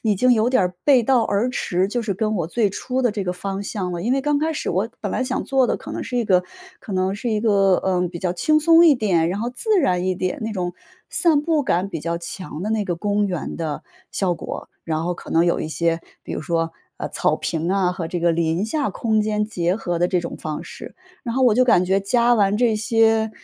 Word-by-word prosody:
已 215 Hz, -3 st, +2 dB
经 250 Hz, +6 st, +3 dB
有 230 Hz, 0 st, +3 dB
点 255 Hz, -7 st, +3 dB
儿 180 Hz, 0 st, -1 dB
背 265 Hz, -5 st, +5 dB
道 250 Hz, 0 st, +3 dB
而 205 Hz, +5 st, 0 dB
驰 185 Hz, -6 st, 0 dB
就 240 Hz, +4 st, -1 dB
是 210 Hz, -3 st, -1 dB
跟 215 Hz, +2 st, -1 dB
我 165 Hz, -3 st, -1 dB
最 210 Hz, +3 st, +1 dB
初 255 Hz, +6 st, -3 dB
的 245 Hz, -, +3 dB
这 210 Hz, -1 st, -3 dB
个 180 Hz, -, -1 dB
方 195 Hz, +2 st, -4 dB
向 190 Hz, -3 st, -3 dB
了。 170 Hz, 0 st, -4 dB
因 235 Hz, -, -1 dB
为 270 Hz, -, +2 dB
刚 295 Hz, 0 st, +1 dB
开 315 Hz, +2 st, 0 dB
始 -, -, -3 dB
我 190 Hz, +6 st, 0 dB
本 -, -, -2 dB
来 -, -, 0 dB
想 255 Hz, 0 st, -2 dB
做 265 Hz, -2 st, +2 dB
的 -, -, 0 dB
可 -, -, -10 dB
能 -, -, -4 dB
是 250 Hz, -, -4 dB
一 235 Hz, -, 0 dB
个 180 Hz, -3 st, +3 dB, 0.4 s
可 205 Hz, -, -8 dB
能 185 Hz, +1 st, 0 dB
是 235 Hz, +4 st, -4 dB
一 215 Hz, -1 st, 0 dB
个， 195 Hz, -4 st, +4 dB
呃， 180 Hz, -1 st, 0 dB
比 170 Hz, -1 st, -7 dB
较 180 Hz, 0 st, -1 dB
轻 305 Hz, -, +2 dB
松 330 Hz, +2 st, +6 dB
一 300 Hz, -, +7 dB
点， 185 Hz, -9 st, +1 dB
然 195 Hz, -, -3 dB
后 240 Hz, -, -2 dB
自 420 Hz, -, +1 dB
然 180 Hz, -9 st, +1 dB
一 185 Hz, -, +1 dB
点， 185 Hz, 0 st, -2 dB
那 220 Hz, -, -2 dB
种 180 Hz, -3 st, -3 dB, 0.4 s
散 320 Hz, -5 st, +3 dB
步 315 Hz, -2 st, +1 dB
感 185 Hz, -4 st, 0 dB
比 165 Hz, -, -4 dB
较 170 Hz, +2 st, -2 dB
强 170 Hz, -2 st, -6 dB
的 210 Hz, -, -2 dB
那 215 Hz, -2 st, 0 dB
个 175 Hz, -, -1 dB
公 205 Hz, +2 st, 0 dB
园 180 Hz, -5 st, -4 dB
的 155 Hz, -3 st, -4 dB, 0.3 s
效 185 Hz, -3 st, 0 dB
果， -, -, -7 dB, 0.2 s
然 160 Hz, -1 st, -2 dB
后 175 Hz, +1 st, -1 dB
可 -, -, -11 dB
能 165 Hz, +1 st, +3 dB
有 170 Hz, -, +1 dB
一 -, -, -3 dB
些， 165 Hz, +1 st, 0 dB, 0.2 s
比 -, -, -7 dB
如 -, -, -4 dB
说， 165 Hz, 0 st, -1 dB, 0.3 s
呃， -, -, -4 dB
草 -, -, 0 dB
坪 165 Hz, +2 st, -2 dB
啊， 190 Hz, -2 st, +2 dB
和 170 Hz, -2 st, -4 dB
这 175 Hz, +1 st, -4 dB
个 170 Hz, 0 st, +3 dB
林 165 Hz, +4 st, 0 dB
下 285 Hz, +5 st, -1 dB
空 220 Hz, -2 st, 0 dB
间 210 Hz, 0 st, 0 dB
结 180 Hz, -4 st, -1 dB
合 175 Hz, -6 st, -2 dB
的 175 Hz, -, +3 dB
这 180 Hz, -2 st, +1 dB
种 170 Hz, -, -6 dB
方 155 Hz, -1 st, -5 dB
式。 -, -, -10 dB, 0.3 s
然 235 Hz, -1 st, -4 dB
后 265 Hz, -, +1 dB
我 235 Hz, -4 st, +5 dB
就 255 Hz, +1 st, +4 dB
感 185 Hz, -7 st, +4 dB
觉 190 Hz, +1 st, +3 dB
加 235 Hz, +4 st, +3 dB
完 200 Hz, -2 st, +2 dB
这 225 Hz, -2 st, +2 dB
些， 225 Hz, 0 st, +2 dB
200 Hz, 280 characters per minute, -22 LUFS, 175-235 Hz, 0.4 s, 一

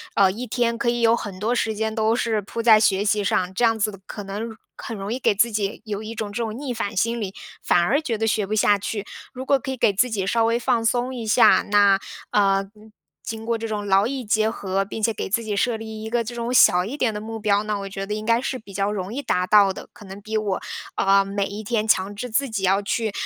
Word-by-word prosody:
呃， 195 Hz, -2 st, +5 dB
一 240 Hz, +6 st, -6 dB
天 235 Hz, 0 st, 0 dB
可 235 Hz, -, 0 dB
以 240 Hz, 0 st, -1 dB
有 230 Hz, 0 st, +5 dB
很 200 Hz, -5 st, -7 dB
多 230 Hz, +5 st, 0 dB
时 220 Hz, -2 st, 0 dB
间 220 Hz, +1 st, -2 dB
都 220 Hz, +1 st, +2 dB
是 225 Hz, -3 st, 0 dB
铺 220 Hz, +3 st, -5 dB
在 220 Hz, -2 st, +7 dB
学 200 Hz, -2 st, +2 dB
习 210 Hz, 0 st, +1 dB
上， 185 Hz, -1 st, 0 dB
这 240 Hz, -, +3 dB
样 225 Hz, -1 st, +2 dB
子 205 Hz, -2 st, -1 dB
可 205 Hz, -, -7 dB
能， 215 Hz, +3 st, -5 dB, 0.2 s
很 230 Hz, -, -6 dB
容 200 Hz, +2 st, -5 dB
易 250 Hz, -, -1 dB
给 210 Hz, -, +2 dB
自 230 Hz, +4 st, +2 dB
己 205 Hz, -1 st, -2 dB
有 210 Hz, 0 st, -4 dB
一 220 Hz, +1 st, -6 dB
种 215 Hz, -2 st, -5 dB
这 235 Hz, +3 st, -2 dB
种 220 Hz, -1 st, -4 dB
逆 270 Hz, -3 st, -4 dB
反 205 Hz, -3 st, -4 dB
心 230 Hz, +4 st, 0 dB
理， 195 Hz, -2 st, -4 dB, 0.3 s
反 175 Hz, -, +3 dB
而 270 Hz, -, +2 dB
觉 235 Hz, -8 st, -2 dB
得 225 Hz, -, 0 dB
学 215 Hz, -2 st, +1 dB
不 210 Hz, -, -4 dB
下 210 Hz, -1 st, +4 dB
去。 205 Hz, +1 st, -4 dB, 0.3 s
如 260 Hz, +1 st, -7 dB
果 280 Hz, -, +4 dB
可 265 Hz, +1 st, -5 dB
以 265 Hz, -, -4 dB
给 220 Hz, -, +3 dB
自 235 Hz, +6 st, +2 dB
己 195 Hz, -3 st, -2 dB
稍 225 Hz, +2 st, +2 dB
微 230 Hz, +1 st, +1 dB
放 230 Hz, -1 st, 0 dB
松 245 Hz, +2 st, 0 dB
一 235 Hz, -2 st, -5 dB
下， 220 Hz, +3 st, +5 dB
那， 200 Hz, -1 st, +5 dB, 0.3 s
呃， 195 Hz, -1 st, +2 dB, 0.5 s
经 225 Hz, 0 st, -6 dB
过 235 Hz, 0 st, 0 dB
这 225 Hz, 0 st, -5 dB
种 210 Hz, -1 st, -3 dB
劳 195 Hz, +2 st, +3 dB
逸 265 Hz, -2 st, -4 dB
结 215 Hz, +1 st, +2 dB
合， 195 Hz, -3 st, -2 dB
并 215 Hz, +3 st, -7 dB
且 225 Hz, +1 st, +2 dB
给 200 Hz, -, -5 dB
自 230 Hz, +3 st, 0 dB
己 210 Hz, -2 st, -3 dB
设 230 Hz, +2 st, +1 dB
立 220 Hz, -1 st, -8 dB
一 220 Hz, -, -5 dB
个 235 Hz, 0 st, 0 dB
这 240 Hz, +2 st, -7 dB
种 235 Hz, 0 st, -3 dB
小 180 Hz, -7 st, +6 dB
一 255 Hz, +9 st, -5 dB
点 235 Hz, -6 st, +1 dB
的 210 Hz, -, -5 dB
目 225 Hz, +1 st, -6 dB
标， 205 Hz, -1 st, +2 dB
那 215 Hz, 0 st, -2 dB
我 195 Hz, 0 st, -5 dB
觉 195 Hz, 0 st, -5 dB
得 210 Hz, -, -4 dB
应 215 Hz, 0 st, -5 dB
该 230 Hz, +1 st, +2 dB
是 260 Hz, 0 st, -3 dB
比 205 Hz, -4 st, -14 dB
较 200 Hz, +1 st, 0 dB
容 200 Hz, 0 st, -4 dB
易 280 Hz, -, -3 dB
达 180 Hz, -8 st, 0 dB
到 205 Hz, -1 st, +5 dB
的， -, -, -9 dB
可 -, -, -14 dB
能 190 Hz, +1 st, -9 dB
比 220 Hz, +2 st, -5 dB
我， 205 Hz, -3 st, -1 dB, 0.4 s
呃， 195 Hz, 0 st, +4 dB
每 195 Hz, 0 st, -2 dB
一 205 Hz, +2 st, -6 dB
天 220 Hz, 0 st, -1 dB
强 195 Hz, -1 st, +2 dB
制 245 Hz, +4 st, -5 dB
自 270 Hz, +4 st, 0 dB
己 215 Hz, -3 st, -3 dB
要 195 Hz, +2 st, +3 dB
去 215 Hz, +2 st, -1 dB
215 Hz, 290 characters per minute, -23 LUFS, 200-230 Hz, 0.5 s, 在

